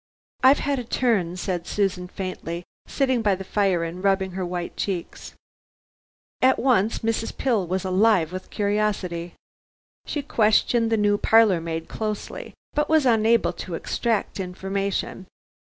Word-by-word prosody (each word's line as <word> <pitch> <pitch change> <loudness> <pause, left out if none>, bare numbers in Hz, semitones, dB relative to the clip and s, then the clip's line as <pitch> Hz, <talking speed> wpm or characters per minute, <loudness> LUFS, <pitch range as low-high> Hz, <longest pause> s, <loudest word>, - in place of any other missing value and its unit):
"I've 265 +2 +6
had 285 -2 0
a - - -4
turn," 215 -8 0
said 175 -2 -3
Susan 190 -3 -1
faintly, 180 -2 -5 0.2
sitting 260 -4 +1
by 205 -3 +2
the 190 - -7
fire 190 -3 +1
and 170 +3 -6
rubbing 195 -1 +1
her 185 +1 -4
white 175 -1 -4
cheeks. 185 -4 -4 1.1
At 260 +1 +5
once 225 -5 +1
Mrs. 225 0 -1
Pill 225 -9 +1
was 185 +2 -2
alive 185 -3 +3
with 185 - -7
curiosity. 200 -5 -1 0.7
She 290 - -3
questioned 225 -1 +2
the 225 - +3
new 205 -1 +2
parlor 220 -6 +4
maid 165 0 -4
closely, 215 -1 -5 0.2
but 295 0 0
was 315 -3 +4
unable 230 -1 +3
to 175 - -6
extract 220 +4 -2
information. 190 +1 -3
200 Hz, 140 wpm, -24 LUFS, 180-225 Hz, 1.1 s, I've